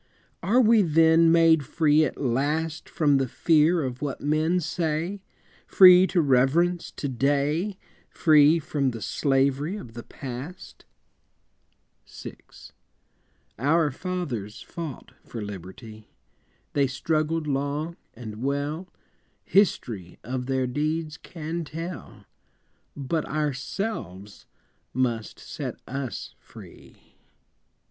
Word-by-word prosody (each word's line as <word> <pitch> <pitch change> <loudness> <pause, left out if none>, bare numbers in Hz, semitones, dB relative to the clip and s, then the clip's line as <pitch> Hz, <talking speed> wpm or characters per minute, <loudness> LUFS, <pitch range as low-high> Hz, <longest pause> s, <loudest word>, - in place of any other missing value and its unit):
Are 210 +9 +3
we 230 -2 +5
then 165 -1 +5
made 165 -2 +5
free 155 +1 +3
at 135 - -5
last 150 +5 -1
From 150 -4 +2
the 135 -1 0
fear 160 +5 +3
of 125 -2 -5
what 145 -2 -3
men 155 +4 +1
say, 170 +3 -2 0.5
Free 185 0 +8
to 180 - +2
reverence 155 +6 +2
To 145 - -4
day, 145 - 0 0.3
Free 155 -1 +5
from 145 -3 -1
the 115 -3 -6
slavery 140 +4 +1
of 120 - -9
the 120 - -7
Past? 135 +8 -9 1.2
VI. - - -9 1.2
Our 150 +3 +2
fathers 135 - -5
fought 165 -7 -8
for 115 - -8
liberty, 105 +2 -9 0.6
They 140 -1 +2
struggled 155 +4 -1
long 145 +3 -2 0.2
and 110 -2 -8
well, 145 +6 -2 0.6
History 120 - 0
of 125 0 -4
their 130 -1 0
deeds 155 +4 -2
can 165 0 -6
tell 165 +3 -8 0.7
But 145 +3 -2
ourselves 135 - -4 0.5
must 120 -4 -1
set - - -6
us 135 -1 -5
free. - - -16
150 Hz, 105 wpm, -25 LUFS, 130-165 Hz, 1.2 s, Free